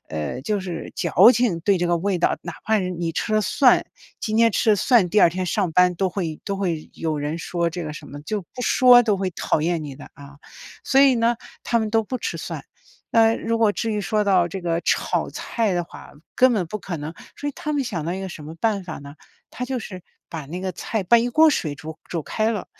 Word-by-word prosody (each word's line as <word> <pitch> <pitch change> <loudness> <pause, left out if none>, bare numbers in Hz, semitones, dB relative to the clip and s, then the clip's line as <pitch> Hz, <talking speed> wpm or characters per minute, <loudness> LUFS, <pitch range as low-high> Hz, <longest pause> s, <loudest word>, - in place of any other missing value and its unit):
呃， 80 - -4
就 210 +6 -1
是 175 -3 -6
矫 235 - +6
情， 230 -10 +1
对 200 +3 +2
这 175 - 0
个 175 - +2
味 190 0 -1
道， - - +1
哪 170 -1 -6
怕 220 - +1
呃， 210 - +3
你 175 -2 -3
吃 215 +6 -1
了 215 - +4
蒜， 250 +4 +4 0.4
今 215 0 -2
天 230 0 +5
吃 220 - +2
了 210 - +4
蒜， 215 -2 +3
第 210 - +4
二 - - +7
天 185 +2 -3
上 180 +1 0
班 180 +1 +4
都 190 +2 0
会 175 -4 -4
都 200 -2 -3
会 170 -5 -3
有 155 -2 -2
人 150 +3 -3
说 170 0 -1
这 175 0 -5
个 150 - -5
什 - - -10
么， 145 - -9
就 210 +6 -3
不 250 +8 -9
说 245 -1 +6
都 215 -4 +1
会 190 -1 -2
讨 160 - -1
厌 165 0 -1
你 140 -2 -7
的 145 - -12
啊， 140 0 -14 0.5
所 270 - +4
以 275 -2 +6
呢， 235 0 +2 0.3
他 235 - +1
们 220 -1 -2
都 225 0 +2
不 250 +4 -4
吃 - - -3
蒜。 - - -6 0.5
那 225 0 +4
如 230 0 -1
果 220 -2 +3
至 225 +1 -2
于 210 - -1
说 210 +1 0
到 185 -3 +3
这 190 +3 -6
个 170 -1 -1
炒 - - 0
菜 225 -5 -2
的 175 - -1
话， - - -13 0.2
根 255 0 +5
本 190 -7 0
不 215 - -5
可 185 -3 -5
能， 150 +1 -6 0.2
所 290 - -4
以 - - -4
他 305 -4 -4
们 285 -2 0
想 175 -10 -4
到 170 - -2
一 190 - -5
个 190 - -5
什 170 -4 -9
么 160 +2 -8
办 205 +1 0
法 175 -3 -7
呢？ 140 0 -11 0.4
他 250 - -5
就 255 0 -3
是 185 -5 -8 0.3
把 160 -3 -6
那 175 +6 -6
个 185 -1 -3
菜 220 +4 -3
把 235 +6 +6
一 235 - 0
锅 315 +6 +5
水 155 - -1
煮 160 +2 -9
煮 165 -3 -2
开 220 +7 -1
了， 210 -5 -3
190 Hz, 270 characters per minute, -22 LUFS, 165-225 Hz, 0.5 s, 二